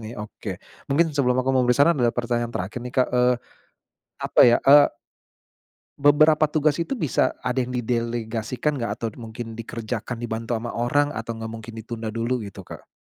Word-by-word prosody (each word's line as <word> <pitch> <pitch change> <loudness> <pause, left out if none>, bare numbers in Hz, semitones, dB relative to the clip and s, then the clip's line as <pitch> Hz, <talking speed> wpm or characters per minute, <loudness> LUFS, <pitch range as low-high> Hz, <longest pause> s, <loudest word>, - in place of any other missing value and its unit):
nih. 110 +2 -8
Oke - - -7 0.3
mungkin 155 +3 +2
sebelum 125 -3 +1
aku 130 +1 +1
memberi 125 -1 +3
saran, 145 0 +4
ada 120 -1 +3
pertanyaan 120 -1 -1
terakhir 100 +7 -4
nih, 125 0 -7
Kak. 130 - +4
Eee, 125 0 +4 0.9
apa - - +2
ya, 120 -1 +6
eee 145 +1 +9 1.1
beberapa 155 +2 +5
tugas 150 0 +1
itu 170 +11 -2
bisa 155 - 0
ada 125 +1 -1
yang 125 0 -2
didelegasikan 120 +3 -2
gak? 115 0 -4
Atau 115 - -1
d - - -19
mungkin 115 0 -8
dikerjakan 115 +1 -5
dibantu 115 0 -3
ama 115 +1 -3
orang, 145 +5 +1
atau 115 -2 -5
nggak 115 0 -6
mungkin 110 0 -9
ditunda 115 0 -6
dulu 115 +2 -1
gitu, 95 -1 -10
Kak? - - -11
120 Hz, 175 wpm, -24 LUFS, 115-135 Hz, 1.1 s, eee